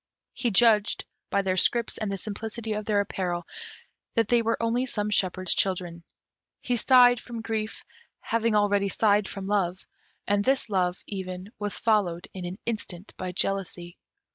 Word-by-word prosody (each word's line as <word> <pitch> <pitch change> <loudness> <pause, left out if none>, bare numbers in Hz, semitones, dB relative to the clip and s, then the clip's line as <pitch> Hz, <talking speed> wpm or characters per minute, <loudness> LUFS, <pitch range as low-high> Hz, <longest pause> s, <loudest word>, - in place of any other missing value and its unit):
He 240 - -1
judged, 210 0 +3 0.2
by 200 - +1
their 185 -1 0
scrips 235 +5 +3
and 215 -3 -2
the 195 - -2
simplicity 220 +2 -5
of 210 0 -4
their 205 -1 +2
apparel, 180 -3 -3 0.7
that 225 -2 +2
they 240 -1 +4
were 230 0 0
only 235 +3 0
some 210 -3 -2
shepherd's 185 -3 +1
children. 175 -3 -1 0.6
He 250 - -1
sighed 245 0 +6
from 230 -1 -7
grief, 220 -1 -4 0.3
having 230 -1 0
already 205 -1 +2
sighed 210 0 +2
from 195 -1 -6
love, 190 -2 -1 0.4
and 205 0 +2
this 260 -2 +1
love, 180 -2 0
even, 185 0 -6
was 205 -1 -3
followed 195 -6 +1
in 185 -2 -6
an 180 +2 -5
instant 205 -4 -4
by 185 -1 -4
jealousy. 180 -2 -2
205 Hz, 160 wpm, -26 LUFS, 185-225 Hz, 0.7 s, sighed